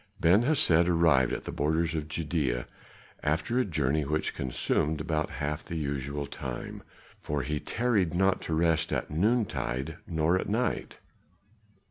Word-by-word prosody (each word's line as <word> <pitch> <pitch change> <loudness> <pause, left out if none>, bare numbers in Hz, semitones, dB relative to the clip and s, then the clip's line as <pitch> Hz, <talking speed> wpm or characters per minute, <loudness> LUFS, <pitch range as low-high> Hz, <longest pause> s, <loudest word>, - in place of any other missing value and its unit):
Ben 90 +6 +5
Hesed 90 - +3
arrived 80 -7 +4
at - - -3
the - - -5
borders 80 +3 0
of 75 -2 -3
Judæa 75 -6 -1 0.6
after 80 +11 0
a - - +4
journey 75 -4 0
which 75 +2 -1
consumed 75 +4 -1
but 80 -2 0
half 75 +3 -3
the 85 - -6
usual 70 -1 -3
time, - - -6 0.4
for 75 -2 -2
he 75 +3 -2
tarried 105 -7 0
not 95 +1 +2
to 80 - -2
rest 80 0 +2
at - - -2
noontide 85 - 0
nor 80 +2 +2
at - - -4
night. 120 +4 -1
80 Hz, 145 wpm, -29 LUFS, 75-85 Hz, 0.6 s, Ben